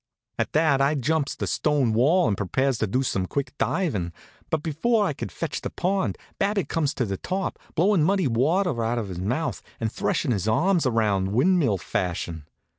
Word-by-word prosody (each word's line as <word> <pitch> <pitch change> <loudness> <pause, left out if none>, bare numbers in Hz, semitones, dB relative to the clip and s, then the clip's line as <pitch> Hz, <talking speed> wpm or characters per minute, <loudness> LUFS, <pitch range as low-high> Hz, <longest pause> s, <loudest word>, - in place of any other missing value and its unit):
At - - -1
that 150 -3 +3
I 140 +3 +3
jumps 145 +2 0
the - - -3
stone 145 -7 +1
wall 155 +11 +4
and 100 - +1
prepares 130 +6 0
to 110 - +1
do 125 +7 0
some 95 -7 -1
quick 140 +2 -3
divin', 105 - 0 0.4
but 155 -2 -1
before 205 +8 +1
I 150 - 0
could - - -6
fetch 165 -4 -4
the - - -3
pond 190 +1 -1 0.2
Babbitt 200 0 0
comes 155 -3 0
to 125 - 0
the 100 -2 -3
top, 190 - -3 0.2
blowin' 185 +2 +3
muddy 190 +3 +2
water 140 +3 +1
out 115 +2 0
of 110 -4 -3
his 90 -2 -5
mouth 125 - -2 0.2
and 110 -1 -1
threshin' 135 - 0
his 105 -2 -1
arms 165 - +2
around 105 -5 +1
windmill 135 - +3
fashion. 85 -3 -3
135 Hz, 190 wpm, -25 LUFS, 110-165 Hz, 0.4 s, wall